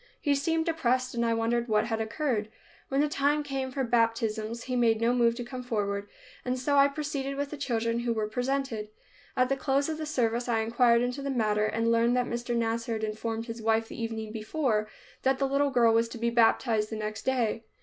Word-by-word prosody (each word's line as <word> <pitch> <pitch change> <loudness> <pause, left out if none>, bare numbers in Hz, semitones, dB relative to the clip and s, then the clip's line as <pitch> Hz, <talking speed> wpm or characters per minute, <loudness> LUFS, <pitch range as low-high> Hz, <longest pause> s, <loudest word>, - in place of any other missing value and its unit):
He 290 - +1
seemed 320 +3 0
depressed 255 -6 0
and 235 0 0
I 230 -1 +2
wondered 235 +1 0
what 215 -1 +2
had 225 -1 -2
occurred. 220 -2 -1 0.4
When 275 +1 +2
the 300 - +3
time 295 +1 +1
came 270 -2 -3
for 265 +1 -2
baptisms 230 -1 0
he 255 -1 -3
made 230 -2 +3
no 230 +2 +2
move 235 -1 +3
to 245 - -4
come 250 +1 -6
forward 205 -4 -2 0.3
and 250 0 -1
so 285 +3 0
I 280 0 +7
proceeded 280 -1 -3
with 285 0 -2
the - - -4
children 230 -4 -1
who 240 0 -1
were 220 -2 -1
presented. 250 -1 -2 0.5
At 255 0 +4
the 275 - +1
close 275 +2 0
of 315 0 -3
the 310 - -4
service 240 -4 0
I 225 -1 +2
inquired 235 +1 +3
into 250 +3 -2
the 280 - -3
matter, 215 -4 +1
and 230 +1 0
learned 235 +2 +3
that 250 - +2
Mr. 240 0 -3
Nasser 230 0 -1
had 220 -1 -3
informed 225 +1 -3
his 230 -1 -7
wife 225 0 +1
the - - -7
evening 220 -1 -4
before 220 -1 -1 0.3
that 265 0 +2
the 275 - +1
little 280 +1 +2
girl 235 -4 +4
was 230 0 +2
to 235 - -7
be 235 +1 0
baptized 225 -2 +3
the 220 - -4
next 215 0 -4
day. 230 -4 0
235 Hz, 220 wpm, -28 LUFS, 225-270 Hz, 0.5 s, I